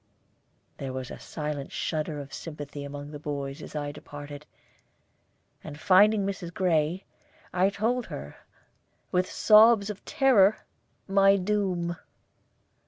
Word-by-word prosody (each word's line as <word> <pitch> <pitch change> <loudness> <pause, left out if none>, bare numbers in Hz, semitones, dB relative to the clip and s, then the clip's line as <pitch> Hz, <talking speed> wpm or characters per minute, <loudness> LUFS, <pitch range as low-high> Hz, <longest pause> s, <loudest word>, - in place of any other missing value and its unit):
There 135 -1 -5
was 130 -1 -5
a - - -8
silent 150 -3 -5
shudder 155 -1 -3
of 140 -1 -9
sympathy 145 -1 -7
among 145 +1 -7
the 150 - -8
boys 140 0 -5
as - - -10
I 145 -1 -3
departed; 145 0 -10 1.2
and 150 -1 -9
finding 200 +3 +5
Mrs. 185 -3 -4
Gray, 175 0 0 0.5
I 185 +2 +3
told 225 +4 -1
her, 70 +1 -8 0.7
with 185 0 +1
sobs 215 -1 +6
of 205 - -11
terror, 255 -9 +3 0.4
my 195 0 +5
doom. 185 -3 -1
170 Hz, 120 wpm, -27 LUFS, 145-200 Hz, 1.2 s, sobs